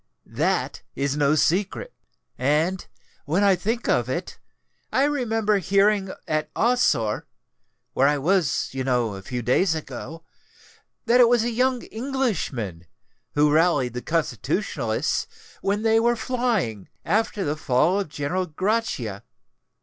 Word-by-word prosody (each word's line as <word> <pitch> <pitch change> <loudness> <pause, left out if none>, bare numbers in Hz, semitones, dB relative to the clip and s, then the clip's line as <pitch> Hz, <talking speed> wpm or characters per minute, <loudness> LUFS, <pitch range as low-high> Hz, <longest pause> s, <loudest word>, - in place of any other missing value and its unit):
That - - -1
is 140 0 -1
no 145 0 +3
secret. 195 - 0 0.4
And, 155 +8 0 0.4
when 170 +8 +1
I 200 -2 +5
think 225 +7 -2
of - - +1
it, - - -4 0.5
I 270 - +3
remember 225 -7 +1
hearing 195 +2 +2 0.2
at 155 0 -1
Ossore 155 - +1 0.7
(where 135 - +3
I 145 0 +2
was, 165 0 +1
you 130 0 -3
know, 125 -4 0
a 95 - -7
few 120 +4 -5
days 160 - +2
ago,) 160 +1 -7 0.8
that 235 +2 +4
it 235 - +6
was 240 -2 +3
a 240 - -1
young 250 +1 +1
Englishman 195 - -3 0.5
who 150 0 +4
rallied 155 -7 +3
the 125 - -4
Constitutionalists 140 - -1 0.3
when 205 +2 0
they 225 0 +4
were 235 +1 +2
flying, 220 - -1 0.2
after 210 +1 0
the 150 -2 -1
fall 155 +6 +2
of 195 - -3
General 165 +6 -2
Grachia." 160 - -2
180 Hz, 135 wpm, -24 LUFS, 140-225 Hz, 0.8 s, it